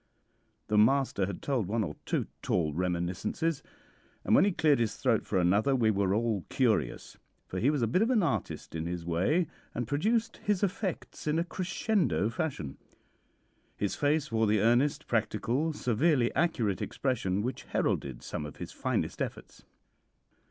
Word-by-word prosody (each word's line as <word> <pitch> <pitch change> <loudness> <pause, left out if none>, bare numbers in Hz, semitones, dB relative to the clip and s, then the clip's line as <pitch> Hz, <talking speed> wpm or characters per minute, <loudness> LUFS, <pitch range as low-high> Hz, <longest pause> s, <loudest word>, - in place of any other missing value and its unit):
The 105 0 +2
master 115 -4 +3
had 100 - -6
told 130 -9 0
one 110 +2 0
or 75 -6 -4
two - - 0 0.2
tall 80 -4 0
reminiscences, 90 - -1 0.6
and - - +1
when - - +7
he 205 - +3
cleared 155 -6 +3
his 115 -2 0
throat - - +1
for - - 0
another 100 +9 +3
we 115 -4 +3
were 100 -1 +1
all 110 -4 0
curious, 110 - 0 0.3
for 95 - -4
he 125 - +3
was 145 -5 +1
a - - +3
bit 155 - +2
of 225 - +3
an 230 -6 +3
artist 160 - -2
in 80 0 -3
his 85 -1 -4
way, 95 - +2 0.3
and 120 -1 -2
produced 220 - 0
his 205 -2 0
effects 190 -4 -3
in 150 +1 +2
a 165 - +2
crescendo 180 - 0
fashion. 115 - -4 1.0
His 100 - -1
face 150 0 +1
wore 110 -1 +2
the 105 0 +3
earnest, 130 +6 +2
practical, 120 +6 0
severely 130 -1 +1
accurate 120 - +1
expression 105 -7 -1
which 125 +3 -4
heralded 65 -3 -1
some 75 - -4
of 75 - -7
his - - -7
finest - - -2
efforts. - - -6
120 Hz, 165 wpm, -30 LUFS, 100-155 Hz, 1.0 s, when